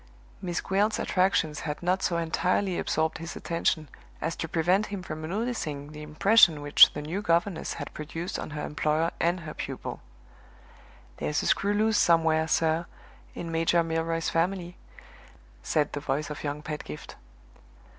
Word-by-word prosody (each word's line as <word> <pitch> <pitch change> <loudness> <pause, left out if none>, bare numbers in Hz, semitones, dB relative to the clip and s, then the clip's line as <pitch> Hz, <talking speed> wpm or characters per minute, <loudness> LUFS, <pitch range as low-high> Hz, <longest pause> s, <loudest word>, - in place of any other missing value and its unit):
Miss 175 -3 -2
Gwilt's 205 +3 +1
attractions 180 -5 +1
had 150 +1 -5
not 185 +2 +1
so 170 - 0
entirely 180 +3 0
absorbed 160 +1 0
his 165 +1 -6
attention 165 -2 -1 0.3
as - - -2
to - - -3
prevent 180 +6 +2
him 200 -3 -5
from 155 -2 -6
noticing 160 -6 -3
the 150 0 -9
impression 155 +1 +4
which 145 0 +8
the 150 - -5
new 170 +7 -3
governess 170 -1 0
had - - -7
produced 165 +3 -5
on - - -5
her 150 0 -4
employer 155 +2 0
and 175 +1 +1
her 155 -2 -7
pupil. - - -6 1.2
"There's 150 - -1
a - - -3
screw 205 +1 +2
loose 215 0 +3
somewhere, 160 -1 +3
sir, 160 +1 +1 0.5
in 165 -1 -5
Major 165 +1 +2
Milroy's 165 0 -1
family," 175 +1 -1 0.9
said 150 -2 0
the 145 - -2
voice 145 +1 -2
of 150 - -6
young 150 0 -3
Pedgift. 150 - -7
165 Hz, 155 wpm, -27 LUFS, 155-180 Hz, 1.2 s, which